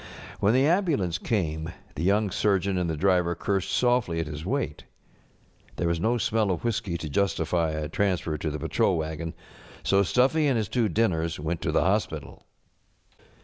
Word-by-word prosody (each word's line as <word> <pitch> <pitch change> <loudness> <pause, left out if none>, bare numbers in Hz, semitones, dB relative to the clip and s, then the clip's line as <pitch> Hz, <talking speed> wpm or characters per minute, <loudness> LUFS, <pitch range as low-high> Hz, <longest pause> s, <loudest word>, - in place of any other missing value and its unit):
When 105 +4 +3
the 130 +2 +4
ambulance 150 - +1
came 80 -8 -1 0.2
the - - -5
young 100 +3 +2
surgeon 100 0 +1
and 90 -2 -1
the 80 - -2
driver 90 -1 +2
cursed 95 +2 -1
softly 120 -6 +1
at 80 - -1
his 75 +1 -6
weight. 120 - -2 0.9
There 85 - -1
was 85 -1 0
no 115 +6 +1
smell 110 -2 +1
of 90 - -2
whiskey 105 -6 -1
to 80 - -6
justify 85 -1 0
a 75 -1 -3
transfer 90 -2 0
to 75 +1 -3
the 75 - -4
patrol 75 - +1
wagon, 80 +1 -4 0.5
so 100 0 +3
Stuffy 135 - +3
and 135 -4 +2
his 110 -4 -1
two 115 -4 +1
diimers 85 -5 0
went 80 +3 -3
to - - -1
the - - +3
hos┬¼ - - +2
pital. - - -9
95 Hz, 180 wpm, -26 LUFS, 80-110 Hz, 0.9 s, the